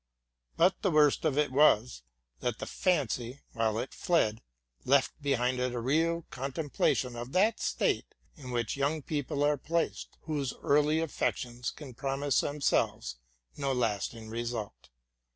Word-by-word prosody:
But 190 - +3
the 195 - +2
worst 150 -2 +4
of 150 -3 +1
it 150 -2 +2
was, 125 - +4 0.4
that 120 - -2
the - - -5
fancy, 135 - -1
while 110 -2 0
it 125 - -4
fled, 115 -11 +1 0.4
left 135 0 +3
behind 130 -3 +1
it 125 -1 -1
a - - -1
real 165 +7 +1
contemplation 135 -2 -1
of 120 +2 -6
that 210 +5 +3
state - - 0 0.2
in 140 -7 -10
which 120 -3 -1
young 145 +2 0
people 145 0 -2
are 145 0 +3
placed, 165 +4 -2
whose 145 -4 -2
early 150 +2 +3
affections 125 -5 -2
can 140 -5 -10
promise 135 +2 0
themselves 140 - 0 0.4
no 140 -1 0
lasting 115 -2 -1
result. 115 - -5
135 Hz, 140 wpm, -30 LUFS, 120-150 Hz, 0.4 s, worst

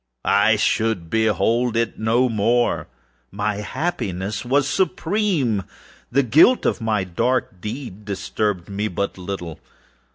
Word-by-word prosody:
I 100 +2 +4
should 105 -5 0
behold 115 +2 +1
it 115 0 -1
no 115 +4 +2
more! 120 +2 +1 0.4
My 105 +1 -2
happiness 105 - -3
was 135 +3 +2
supreme! 170 - 0 0.5
The 140 +3 +3
guilt 155 - +5
of - - 0
my 110 -3 0
dark 95 +2 -1
deed 105 -2 -6
disturbed 100 -2 -2
me 100 +2 -2
but 100 0 -3
little. 90 -4 -6
110 Hz, 120 wpm, -22 LUFS, 100-125 Hz, 0.5 s, guilt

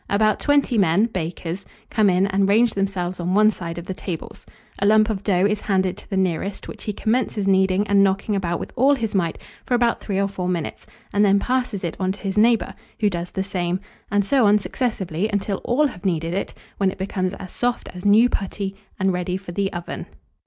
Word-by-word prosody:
About 215 +1 +2
twenty 285 -5 +2
men 190 +3 +4
(bakers) 175 -2 -4 0.3
come 215 -3 +4
in 185 +1 +3
and 195 0 +1
range 225 +2 +4
themselves 185 -2 -2
on 175 +2 0
one 215 +1 +6
side 170 -4 -6
of 170 - -6
the 190 - -4
tables. 180 -3 -7 0.3
A 200 - +1
lump 215 +1 +5
of 195 -3 -3
dough 190 -2 +2
is 210 0 +1
handed 190 -2 +1
to - - -12
the 195 - -1
nearest, 190 +1 -1
which - - -9
he 210 - -1
commences 215 -1 0
kneading 190 +1 +3
and 200 -1 +4
knocking 195 +2 +1
about 175 -3 -1
with - - -7
all 275 +4 +4
his 225 -5 -3
might 170 -4 0 0.3
for 250 - 0
about 240 -1 +2
3 195 -3 -2
or 200 - +2
4 190 -2 -4
minutes, 170 -3 -3 0.3
and 205 +1 +4
then 200 -1 +5
passes 245 -2 -1
it 170 - -2
on 185 0 0
to 200 - -13
his 195 0 -3
neighbour, 225 +2 +3 0.3
who 210 -2 +2
does 175 0 -4
the 190 - -2
same; 180 -2 -2 0.3
and 205 0 +2
so 255 0 +4
on 205 +1 +6
successively 205 -5 -2
until 200 -1 -1
all 275 +6 +2
have 220 -10 -4
kneaded 165 -3 -1
it, 195 - -3 0.2
when 195 -1 +2
it - - -7
becomes 190 -1 -2
as 185 -2 -9
soft 245 0 -1
as 180 0 -9
new 215 +4 +6
putty, 195 -3 -3 0.2
and 190 -1 +2
ready 180 0 -2
for 190 -2 -9
the 195 +2 -1
oven. 175 -1 -6
195 Hz, 220 wpm, -22 LUFS, 185-215 Hz, 0.3 s, one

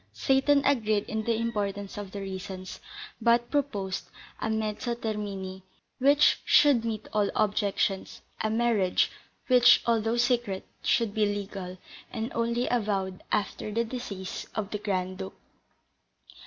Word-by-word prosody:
Seyton 275 +1 +3
agreed 215 -7 +2
in 220 0 -3
the 230 - +2
importance 205 -3 -2
of 205 -2 -6
the 200 - -5
reasons, 190 -1 -6 0.4
but 235 +1 +3
proposed, 205 -10 -1 0.3
as 220 - -1
a - - +1
mezzo 220 +2 -2
termini 200 -4 -4 0.4
which 285 +3 +5
should 280 -6 +5
meet 220 -2 -3
all 210 -1 +2
objections, 200 -2 0 0.2
a 215 - 0
marriage, 220 -5 +2 0.3
which, 245 -2 +6
although 230 0 +1
secret, 240 -5 +1 0.2
should 230 -4 +1
be 215 -1 +2
legal, 195 -2 -4 0.3
and 230 +2 -3
only 235 +1 0
avowed 195 -5 -1
after 210 +1 -1
the 230 +2 +1
decease 210 -6 -5
of 210 -2 -3
the 210 - -2
Grand 185 -3 -2
Duke. 95 - -6
215 Hz, 135 wpm, -28 LUFS, 195-235 Hz, 0.4 s, which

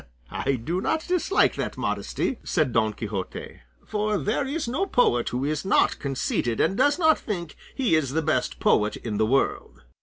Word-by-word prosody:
"I 140 - -1
do 150 +10 -2
not 315 +9 -1
dislike 365 +2 +2
that - - -3
modesty," 260 - -2
said 155 -8 0
Don 110 -1 +2
Quixote; 100 -3 -6 0.3
"for 210 0 -1
there 220 +8 -1
is 295 0 -2
no 300 +12 -1
poet 120 - +2
who 125 +2 -2
is 150 +1 -1
not 195 - +2
conceited 125 -4 -1
and 175 +5 +2
does 290 +7 +3
not 315 -3 +4
think 175 -7 -5 0.2
he 255 -9 +1
is 145 -4 +2
the 160 +1 0
best 155 -5 0
poet 105 0 +2
in 110 -3 -4
the 110 0 +2
world." 135 - -1
160 Hz, 180 wpm, -25 LUFS, -, 0.3 s, not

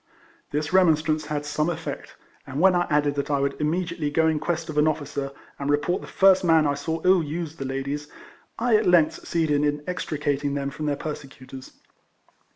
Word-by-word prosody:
This 150 +3 -2
remonstrance 155 -4 +3
had 150 -1 -3
some 150 +2 0
effect; 175 - -6 0.3
and 130 +2 -4
when 190 +2 +5
I 175 0 +1
added 145 -1 +2
that 140 0 -3
I 140 -1 +1
would 140 +2 -2
immediately 165 0 -1
go 160 +2 +2
in 160 -1 +1
quest 165 +1 -2
of 155 -2 -1
an 150 - +4
officer, 145 -2 -2 0.3
and 140 0 -3
report 150 +5 +1
the - - -10
first 190 -1 +4
man 160 -3 +4
I 145 - +2
saw 160 +3 -3
ill 185 -1 +5
use 160 +1 -5
the 135 - -5
ladies, 140 +2 -3 0.5
I 235 -1 +2
at - - 0
length 165 -3 +5
succeeded 155 -3 0
in 145 0 0
extricating 145 -5 -2
them 140 0 -2
from 155 +1 -5
their 145 - +1
persecutors. 135 -3 -8
150 Hz, 190 wpm, -24 LUFS, 145-165 Hz, 0.5 s, when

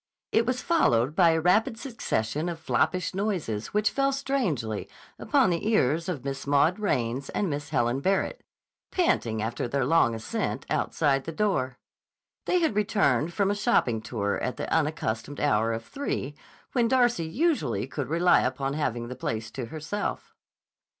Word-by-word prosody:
It 225 +1 +2
was 250 0 -1
followed 140 - +2
by 175 -2 +6
a 160 0 +3
rapid 220 +8 +2
succession 160 - -2
of 170 - -4
floppish 180 +3 0
noises 180 - -2
which 210 0 +1
fell 275 0 +1
strangely 230 - -2 0.3
upon - - +3
the 170 +4 -1
ears 165 - +2
of 145 -8 -4
Miss 135 0 -4
Maud 145 +7 +3
Raines 130 - -1
and 205 - -1
Miss 145 0 -4
Helen 120 +3 +1
Barrett, 195 - 0 0.5
panting 115 - +1
after 115 +2 -2
their 135 +1 0
long 135 -6 +3
ascent, 110 0 -3
outside 135 -3 +1
the 165 - -4
door. 155 -9 0 0.7
They 360 - +2
had 320 -11 +1
returned 175 - +2
from 200 +2 +1
a - - 0
shopping 130 - +1
tour 100 -3 -2
at 125 - -2
the - - -3
unaccustomed 145 -5 -1
hour 115 -5 +2
of 115 0 -4
three 150 - -3 0.4
when 240 -3 +2
Darcy 240 -9 +2
usually 160 - 0
could 140 +1 -5
rely 170 +3 +4
upon 135 +2 -1
having 120 -6 -2
the 125 - -6
place 110 -2 -4
to 130 0 -5
herself. 155 - -4
155 Hz, 160 wpm, -27 LUFS, 125-205 Hz, 0.7 s, by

